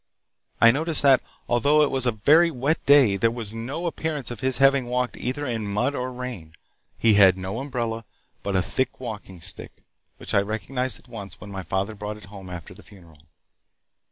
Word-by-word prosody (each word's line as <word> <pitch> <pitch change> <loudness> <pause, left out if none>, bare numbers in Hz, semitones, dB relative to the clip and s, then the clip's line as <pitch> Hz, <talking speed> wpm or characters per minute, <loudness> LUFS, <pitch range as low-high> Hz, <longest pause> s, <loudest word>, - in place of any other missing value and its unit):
I 115 - +8
noticed 155 +3 0
that, 135 -2 +6 0.3
although 145 +5 +4
it 145 - +1
was 130 -2 -1
a - - +4
very 155 +11 +4
wet 145 +2 -1
day, 135 -9 +6
there 115 +4 +3
was 115 -3 -6
no 130 +10 -5
appearance 155 -6 -3
of 120 - -7
his 130 -1 +2
having 135 -2 +4
walked 125 0 -1
either 130 +4 -3
in 110 -5 -3
mud 125 +8 0
or 130 -2 -3
rain. 125 -11 -7 0.4
He 115 -2 +4
had 95 -2 +6
no 95 +4 -4
umbrella, 115 -5 -3 0.4
but 100 -1 -3
a 95 - +2
thick 130 +7 -2
walking 105 -7 -8
stick, - - -6 0.3
which - - -5
I 100 - +5
recognized 110 +5 -2
at - - -22
once 100 -6 -9
when 100 - -10
my 95 -1 -5
father 95 +4 -2
brought 105 0 -6
it 105 - -13
home 95 -2 -10
after 90 0 -8
the 105 - -15
funeral. 85 -8 -17
115 Hz, 195 wpm, -24 LUFS, 100-130 Hz, 0.4 s, I